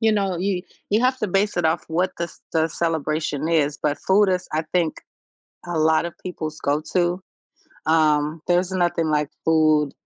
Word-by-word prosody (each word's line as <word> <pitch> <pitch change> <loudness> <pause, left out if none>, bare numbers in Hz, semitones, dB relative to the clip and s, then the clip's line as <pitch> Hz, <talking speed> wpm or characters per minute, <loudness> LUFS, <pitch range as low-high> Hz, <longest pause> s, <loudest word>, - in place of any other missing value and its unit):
you 220 -1 +3
know, 195 -3 0
you 185 0 -1 0.3
you 215 - +3
have 255 +1 +2
to 215 - -1
base 195 +2 0
it 175 - 0
off 160 +1 +1
what 180 +3 0
the 170 - 0
s 170 - -12
the 160 0 +2
celebration 155 -2 -1
is, 150 -3 +1
but, 150 -1 0
food 195 +1 +3
is, 185 -1 0
I 155 +1 0
think, 170 -3 +1 0.7
a 175 -2 -2
lot 160 +1 +3
of 170 - -7
people's 155 -4 -5
go-to. 175 +5 0 0.7
Um, 155 -1 +2
there's 180 +1 +2
nothing 175 -3 +1
like 150 -1 +1 0.2
food, 155 -3 +3
165 Hz, 180 wpm, -23 LUFS, 155-185 Hz, 0.7 s, you